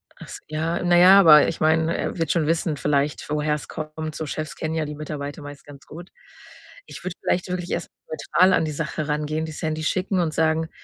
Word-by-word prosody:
Ach - - -12
s - - -9
ja, 160 +3 -2
na 175 -1 +4
ja, 190 +2 +8
weil 150 -2 +8
ich 165 - -6
meine, 160 +1 +2
er - - -3
wird 165 -3 -1
schon 160 -4 +1
wissen 165 -1 0
vielleicht, 145 +1 -1
woher 150 0 0
es 150 - -8
kommt. 155 0 -6
So 160 - -4
Chefs 155 +1 -5
kennen 155 0 -4
ja 160 -1 -1
die 150 0 -6
Mitarbeiter 145 -1 -6
meist 145 -1 -11
ganz 145 -1 -14
gut. 170 +3 -11 0.8
Ich - - -11
würde 185 -1 -5
vielleicht 180 +1 -1
wirklich 180 -1 -4
erst 170 - -3 0.2
neutral 175 +4 +2
an 165 - +2
die 155 - -3
Sache 150 0 -4
rangehen, 150 +1 -2
die 160 - -7
Sandy 155 +1 -4
schicken 185 +3 0
und 165 -3 0
sagen, 160 0 +1
155 Hz, 220 wpm, -23 LUFS, 150-170 Hz, 0.8 s, ja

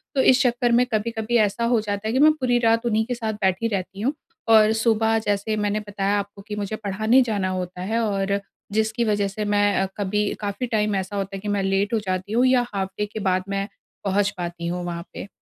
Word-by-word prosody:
तो 265 - +4
इस 255 -1 +5
चक्कर 240 -1 +1
में 245 +1 +4
कभी-कभी 225 +2 0
ऐसा 235 +4 -4
हो 230 - +4
जाता 205 0 -3
है - - 0
कि 260 - +2
मैं 305 +1 +7
पूरी 255 -5 +1
रात 230 +1 +2
उन्हीं 220 -1 +1
के 245 0 -3
साथ 220 -2 -3
बैठी 190 +4 +1
रहती 195 +1 -5
हूँ 270 +6 +1 0.4
और 220 -1 +6
सुबह 225 -1 +3
जैसे 205 +1 0
मैंने 210 0 0
बताया 200 0 0
आपको 200 0 -7
कि 210 - -4
मुझे 205 +1 -3
पढ़ाने 220 +4 +2
जाना 195 -3 0
होता 180 -1 -4
है 220 +5 -1
और 200 -2 0 0.3
जिसकी 220 +2 +1
वजह 205 -2 +1
से 210 +2 -4
मैं 205 0 +2
अ, 190 - +2
कभी 205 +1 0
काफ़ी 205 +5 -3
टाइम 210 -3 0
ऐसा 190 +1 -3
होता 195 0 -3
है - - -5
कि 210 - -6
मैं 195 - 0
लेट 195 +2 0
हो 225 - +3
जाती 185 0 -3
हूँ 245 +3 +4
या 255 -1 +3
हाल्फ़ 190 -1 -2
डे 210 - +1
के 220 - -4
बाद 185 0 0
मैं 195 0 -1 0.4
पहुँच 200 +1 +2
पाती 170 -1 -4
हूँ 175 0 -3
वहाँ 170 0 -5
पे। - - -7
210 Hz, 235 wpm, -23 LUFS, 195-225 Hz, 0.4 s, मैं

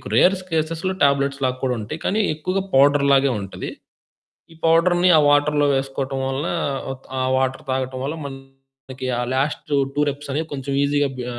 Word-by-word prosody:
Rare 190 +2 +5
స్కెస్‌లో 165 +1 -2
tablets 140 0 +2
లాగా 130 0 -1
కూడా 125 -1 +1
ఉంటాయి. 135 +10 -6
కానీ 215 +3 +1
ఎక్కువగా 185 +5 -2
పౌడర్ 140 +1 +5
లాగే 135 0 +4
ఉంటది. 95 - -6 0.8
ఈ - - -18
పౌడర్‌ని 175 +2 +4
ఆ - - +6
వాటరులో 145 0 +3
వేసుకోవటం 135 0 -2
వలన 135 +5 -2 0.7
ఆ - - +1
వాటరు 130 +3 -1
తాగటం 130 0 -2
వల్ల 150 +4 -3
మనకి 135 -1 -10
ఆ - - 0
లాస్ట్ 140 +3 -1 0.3
2 145 - +1
రెప్స్ 140 0 -7
అనేవి 155 +2 -2
కొంచెం 140 0 -5
ఈజీగా 145 0 +1
బి 125 - -4
140 Hz, 160 wpm, -21 LUFS, 135-155 Hz, 0.8 s, ఆ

